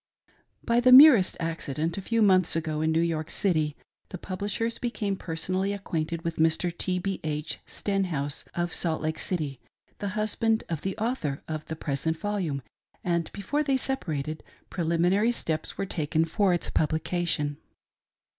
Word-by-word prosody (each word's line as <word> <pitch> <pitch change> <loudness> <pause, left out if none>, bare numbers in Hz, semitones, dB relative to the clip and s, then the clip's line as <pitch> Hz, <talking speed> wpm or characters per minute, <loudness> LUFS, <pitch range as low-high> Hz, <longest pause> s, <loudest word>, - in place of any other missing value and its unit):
By 235 0 +3
the 250 +1 +4
merest^accident, 170 - +6
a 195 - -4
few 230 +3 +1
months 185 -5 +4
ago, 155 -2 -1
in 160 0 +2
New 160 +1 +2
York 160 -2 -1
City, 155 -7 0 0.3
the 185 - -6
Publishers 205 +6 -3
became 215 -5 -2
personally 185 +3 -2
acquainted 165 -4 -3
with 165 -1 -3
Mr. 165 +2 +2
T. 180 +1 -1
B. 190 +1 -2
H. 150 0 -3
Stenhouse, 170 -8 -2
of 175 0 -1
Salt 160 -2 -1
Lake 155 0 -2
City, 150 -8 -2 0.4
the 200 0 -3
husband 220 +1 +1
of 165 -3 -2
the 195 +1 -3
Author 220 - -2
of 155 -1 -4
the 160 - -4
present 155 +2 -2
volume, 180 -9 -2 0.4
and 170 -2 0
before 245 +10 -1
they 275 -3 +2
separated, 155 - -3 0.3
preliminary 175 +6 +2
steps 160 -9 -3
were 195 - -1
taken 160 -3 0
for 190 +4 +2
its 175 - 0
publication. 155 -1 0
170 Hz, 150 wpm, -27 LUFS, 155-200 Hz, 0.4 s, merest^accident